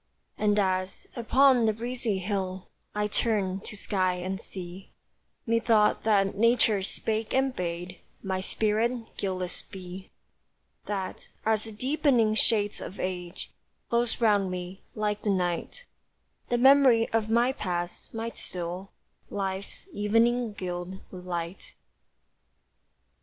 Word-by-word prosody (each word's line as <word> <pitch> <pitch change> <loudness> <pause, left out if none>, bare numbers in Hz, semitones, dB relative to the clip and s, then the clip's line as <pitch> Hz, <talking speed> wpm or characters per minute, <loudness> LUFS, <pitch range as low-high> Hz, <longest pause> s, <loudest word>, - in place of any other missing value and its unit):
And 210 -1 +2
as, 185 -1 0
upon 250 0 +4
the 220 - +3
breezy 235 -2 -2
hill, 190 -1 -3 0.3
I 210 0 +1
turned 200 -3 0
to 210 - -6
sky 185 -2 +1
and 185 +2 -4
sea, 185 0 -8 0.6
Methought 230 -2 +3
that 200 -3 +3
nature 225 -2 +4
spake 220 +4 -1
and 265 -1 +2
bade 175 0 -4 0.2
My 190 -1 -1
spirit 225 +4 0
guileless 185 -2 -2
be, 185 0 -9 0.8
That, 195 -2 -4 0.2
as 220 -1 +2
the 225 - -6
deepening 250 -1 +2
shades 210 -2 +2
of 190 - -7
age 180 -1 -4 0.4
Close 235 0 +2
round 205 -4 +3
me, 180 +1 -5
like 210 -1 -1
the 210 - -1
night, 185 - -1 0.6
The 240 - +2
memory 260 -3 +6
of 225 -1 0
my 235 +3 +4
past 175 -7 -3
might 225 0 -4
still 180 +2 -3 0.4
Life's 195 - -4
evening 230 +2 +2
gild 180 -1 -5
with 180 -1 -9
light. 170 +1 -5
205 Hz, 120 wpm, -28 LUFS, 185-230 Hz, 0.8 s, memory